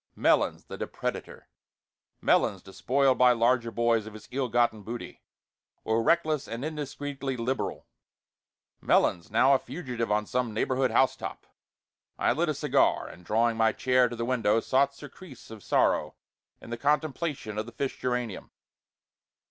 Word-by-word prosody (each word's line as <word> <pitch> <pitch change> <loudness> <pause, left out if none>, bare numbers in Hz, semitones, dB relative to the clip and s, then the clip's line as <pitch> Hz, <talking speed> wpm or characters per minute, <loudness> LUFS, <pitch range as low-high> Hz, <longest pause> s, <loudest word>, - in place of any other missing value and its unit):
Melons - - +2
the - - -9
depredator - - -5 0.8
Melons, - - +2
despoiled 130 +7 +1
by 125 -1 +6
larger 120 0 +2
boys 115 -2 +1
of 110 - -10
his 110 - -12
ill 130 -1 -1
gotten 120 -2 +1
booty, 115 +4 -8 0.6
or 110 +1 +1
reckless 155 +1 +1
and 115 +4 -5
indiscreetly 145 -3 -4
liberal; 125 +3 -3 1.0
Melons 85 - +2
now 130 +6 +4
a 135 - +4
fugitive 125 -6 -4
on 105 0 +1
some 120 -1 -2
neighborhood 130 +3 +1
housetop. 130 - 0 0.7
I - - +2
lit - - 0
a - - -1
cigar, - - +2
and, 90 - -13
drawing 115 +4 +1
my 110 0 +3
chair 125 -1 +2
to 120 - -6
the 115 0 -3
window, 115 -3 +2
sought 140 +4 +1
surcease 145 -3 -13
of 110 -2 -10
sorrow - - +1 0.4
in - - -12
the 120 - -3
contemplation 145 -6 -1
of 110 - -4
the - - -8
fish 135 +3 -4
geranium. 125 -5 -3
125 Hz, 150 wpm, -28 LUFS, 115-135 Hz, 1.0 s, by